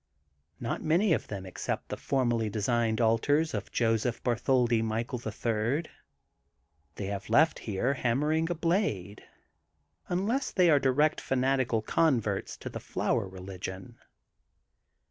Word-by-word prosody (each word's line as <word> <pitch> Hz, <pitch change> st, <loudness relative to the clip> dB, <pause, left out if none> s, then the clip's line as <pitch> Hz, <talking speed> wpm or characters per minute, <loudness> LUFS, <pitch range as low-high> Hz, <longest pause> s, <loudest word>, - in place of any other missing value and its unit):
Not 115 Hz, -, -3 dB
many 170 Hz, +4 st, +3 dB
of -, -, -1 dB
them 95 Hz, -2 st, -6 dB
accept 95 Hz, -, -4 dB
the -, -, -2 dB
formally 120 Hz, -5 st, 0 dB
designed 110 Hz, +2 st, 0 dB
altars 145 Hz, +8 st, +2 dB
of 105 Hz, -2 st, -4 dB
Joseph 115 Hz, 0 st, 0 dB
Bartiioldi 120 Hz, -1 st, +2 dB
Michael, 115 Hz, +2 st, -2 dB
the 110 Hz, -2 st, -5 dB
Third, 115 Hz, +8 st, -1 dB, 1.0 s
they 100 Hz, -, -4 dB
have 100 Hz, 0 st, -5 dB
left 160 Hz, +2 st, +4 dB
here 110 Hz, +6 st, -1 dB
hammering 150 Hz, +6 st, +1 dB
a 175 Hz, -, -1 dB
blade, 160 Hz, -, -1 dB, 0.9 s
unless 210 Hz, +10 st, 0 dB
they 180 Hz, -3 st, +4 dB
are 145 Hz, -, +5 dB
di 135 Hz, -, +2 dB
rect 150 Hz, +4 st, +2 dB
fanatical 130 Hz, -3 st, +1 dB
converts 115 Hz, -11 st, +1 dB
to -, -, -9 dB
the -, -, -6 dB
Flower -, -, -1 dB
Religion. 95 Hz, +3 st, -8 dB
120 Hz, 130 wpm, -29 LUFS, 110-150 Hz, 1.0 s, are